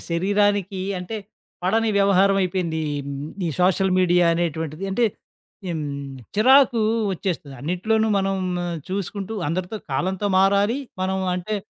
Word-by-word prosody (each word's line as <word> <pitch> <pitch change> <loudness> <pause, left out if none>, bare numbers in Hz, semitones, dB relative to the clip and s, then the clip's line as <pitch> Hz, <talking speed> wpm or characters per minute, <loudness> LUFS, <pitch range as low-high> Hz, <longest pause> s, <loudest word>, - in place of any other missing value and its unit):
శరీరానికి 200 +2 +1 0.2
అంటే, 180 +5 -5 0.5
పడని 220 +5 +2
వ్యవహారం 195 0 +4
అయిపోయింది. 175 -3 -1 0.7
ఈ - - 0
సోషల్ 190 +1 +3
మీడియా 175 -1 +4
అనేటువంటిది. 160 0 -2
అంటే, 235 +5 +2 0.6
హ్మ్, 165 -3 -2 0.5
చిరాకు 250 +1 +5 0.3
వచ్చేస్తుంది. 165 -7 -4
అన్నిట్లోనూ 220 +7 0
మనం 195 0 0 0.5
చూసుకుంటూ 200 +2 -4
అందరితో 180 +5 -3 0.2
కాలంతో 190 +7 -1
మారాలి. 200 +6 +3 0.2
మనం 190 +1 0 0.2
అంటే, 205 +4 -2
190 Hz, 110 wpm, -23 LUFS, 175-205 Hz, 0.7 s, చిరాకు